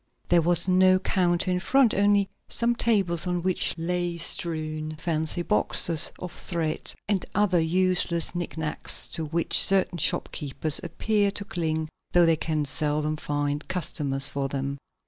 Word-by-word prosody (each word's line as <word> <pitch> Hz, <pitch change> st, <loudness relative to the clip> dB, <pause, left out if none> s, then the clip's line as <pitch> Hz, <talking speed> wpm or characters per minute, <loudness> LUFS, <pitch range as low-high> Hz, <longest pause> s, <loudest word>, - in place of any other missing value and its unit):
There 175 Hz, -1 st, +4 dB
was 175 Hz, +2 st, +2 dB
no 185 Hz, 0 st, +4 dB
counter 185 Hz, -1 st, 0 dB
in 180 Hz, -, 0 dB
front, 260 Hz, +4 st, +2 dB
only 200 Hz, 0 st, +2 dB, 0.2 s
some 235 Hz, 0 st, 0 dB
tables 195 Hz, -8 st, +2 dB
on 175 Hz, -1 st, -2 dB
which 185 Hz, -1 st, 0 dB
lay 175 Hz, +1 st, -2 dB
strewn 155 Hz, -2 st, -2 dB
fancy 160 Hz, +1 st, -2 dB
boxes 165 Hz, -1 st, +5 dB
of 180 Hz, -, -8 dB
thread 165 Hz, -3 st, -4 dB, 0.2 s
and 200 Hz, -3 st, 0 dB
other 195 Hz, -4 st, +2 dB
useless 175 Hz, 0 st, 0 dB
knick 175 Hz, -2 st, -6 dB
knacks 160 Hz, -1 st, +2 dB
to 160 Hz, -, -4 dB
which 165 Hz, +2 st, +1 dB
certain 190 Hz, -2 st, +3 dB
shopkeepers 155 Hz, -2 st, 0 dB
appear 210 Hz, -2 st, -1 dB
to 200 Hz, 0 st, -4 dB
cling 160 Hz, -4 st, -3 dB, 0.3 s
though 175 Hz, -1 st, +5 dB
they 165 Hz, -1 st, +3 dB
can 155 Hz, -1 st, -2 dB
seldom 150 Hz, +2 st, -1 dB
find 145 Hz, -1 st, -3 dB
customers 140 Hz, -6 st, -1 dB
for 140 Hz, -1 st, -3 dB
them. 140 Hz, 0 st, -4 dB
170 Hz, 145 wpm, -25 LUFS, 155-185 Hz, 0.3 s, boxes